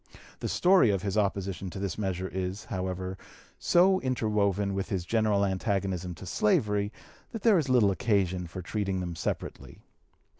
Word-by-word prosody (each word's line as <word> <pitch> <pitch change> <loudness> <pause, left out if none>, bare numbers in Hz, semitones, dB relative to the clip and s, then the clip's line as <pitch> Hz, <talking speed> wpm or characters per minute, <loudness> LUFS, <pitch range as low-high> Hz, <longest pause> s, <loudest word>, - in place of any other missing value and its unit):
The - - -3
story 180 - +4
of 100 -3 0
his 100 -1 -2
opposition 100 -2 -1
to 90 - -8
this 95 -2 -3
measure 95 -2 -2
is, 95 +2 -4
however, 95 -1 -4 0.4
so 185 +2 +4
interwoven 105 -5 0
with 95 +2 -3
his 95 -5 -2
general 105 -1 +2
antagonism 95 -2 -2
to 95 - -10
slavery, 105 +2 +1 0.4
that 225 - -6
there 215 -6 +5
is 140 -4 -2
little 120 -6 +4
occasion 95 -4 0
for 90 +2 -7
treating 95 0 -2
them 90 -2 -4
separately. - - -5
100 Hz, 155 wpm, -28 LUFS, 95-105 Hz, 0.4 s, there